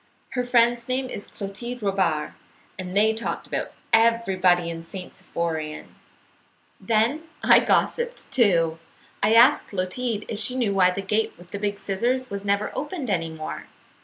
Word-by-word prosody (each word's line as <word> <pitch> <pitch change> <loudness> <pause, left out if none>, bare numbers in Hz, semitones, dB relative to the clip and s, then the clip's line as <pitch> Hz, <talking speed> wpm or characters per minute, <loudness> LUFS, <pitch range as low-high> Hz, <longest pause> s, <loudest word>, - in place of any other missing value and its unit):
Her 250 -2 -1
friend's 240 -1 +3
name 260 0 -1
is 205 - -5
Clotilde 225 +4 -6
Robard. 185 -6 0 0.5
They 200 +4 +2
talked 225 +1 -4
about - - -3 0.2
everybody 190 -6 +3
in 165 -1 -5
St. 180 +2 -9
Symphorien. 160 -2 -4 0.9
"Then 235 +8 +1 0.2
I - - +7
gossiped, 480 0 0
too. 170 -11 +3 0.4
I 215 +2 +4
asked 250 +6 +6
Clotilde 205 +4 -2
Robard - - -11
if 210 - -3
she 250 +4 -1
knew 235 -6 +1
why 185 -2 +5
the 195 +2 -3
gate 215 +3 0
with 175 +1 -16
the 200 - -4
big 205 0 -1
scissors 245 +7 -1
was 200 0 -4
never 200 +1 0
opened 295 - -3
any 165 -3 0
more. 155 -1 -6
205 Hz, 155 wpm, -24 LUFS, 185-240 Hz, 0.9 s, I